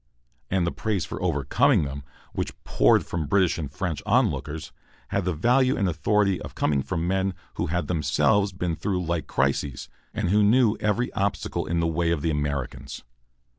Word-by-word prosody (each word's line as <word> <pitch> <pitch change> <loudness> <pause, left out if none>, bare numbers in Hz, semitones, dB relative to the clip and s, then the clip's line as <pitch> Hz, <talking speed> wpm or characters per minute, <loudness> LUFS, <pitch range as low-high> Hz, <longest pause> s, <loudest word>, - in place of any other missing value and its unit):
And 95 -2 +1
the 85 - 0
praise 105 -4 -2
for - - -6
overcoming 70 +2 +2
them 70 0 -5 0.3
which - - -3
poured - - +3
from 80 -4 -3
British 95 0 +2
and 75 -4 -4
French 90 -2 -3
onlookers 75 +1 0 0.4
had 100 -2 -1
the 90 - 0
value 125 - +3
and 100 - +1
authority 100 +2 +1
of - - -8
coming 70 -3 +1
from 80 +5 -2
men 95 0 0 0.2
who - - -1
had 85 0 -1
themselves 90 +6 +2
been 90 -2 -2
through 90 +1 -2
like 85 -1 -2
crises, 70 -1 -1 0.2
and - - -2
who 105 +1 +4
knew 110 +1 +4
every 110 +4 0
obstacle 100 -2 -1
in 85 +1 0
the - - +1
way 85 +1 0
of 80 -3 0
the 80 - +1
Americans. 70 -2 -3
85 Hz, 175 wpm, -25 LUFS, 75-100 Hz, 0.4 s, who